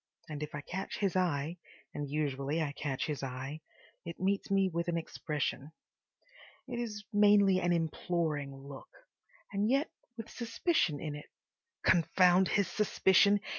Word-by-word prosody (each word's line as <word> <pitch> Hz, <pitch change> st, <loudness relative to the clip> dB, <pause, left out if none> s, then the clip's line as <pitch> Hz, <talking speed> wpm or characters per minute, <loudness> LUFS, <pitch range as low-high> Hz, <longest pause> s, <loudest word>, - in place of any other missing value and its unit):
And 150 Hz, -2 st, -6 dB
if 150 Hz, 0 st, -5 dB
I 150 Hz, -, -4 dB
catch 190 Hz, +6 st, -5 dB
his 195 Hz, -4 st, 0 dB
eye—and 160 Hz, -3 st, -3 dB
usually 145 Hz, 0 st, -1 dB
I 155 Hz, -3 st, -1 dB
catch 140 Hz, -2 st, -3 dB
his 150 Hz, -3 st, -3 dB
eye—it 140 Hz, +5 st, -8 dB
meets 195 Hz, +2 st, 0 dB
me 195 Hz, -1 st, +3 dB
with 170 Hz, -1 st, -2 dB
an 170 Hz, -1 st, 0 dB
expression. 150 Hz, -2 st, -3 dB, 0.9 s
It 245 Hz, -2 st, -4 dB
is 215 Hz, -3 st, -4 dB
mainly 205 Hz, -2 st, +5 dB
an 175 Hz, -1 st, +1 dB
imploring 160 Hz, -3 st, -1 dB
look—and 195 Hz, +8 st, -7 dB
yet 275 Hz, +4 st, +2 dB, 0.3 s
with 225 Hz, 0 st, -6 dB
suspicion 230 Hz, -, 0 dB
in 155 Hz, -2 st, -4 dB
it. 150 Hz, 0 st, -9 dB, 0.6 s
Confound 180 Hz, +1 st, +5 dB
his 200 Hz, -3 st, +2 dB
suspicion! 200 Hz, +1 st, +4 dB
170 Hz, 130 wpm, -32 LUFS, 150-200 Hz, 0.9 s, mainly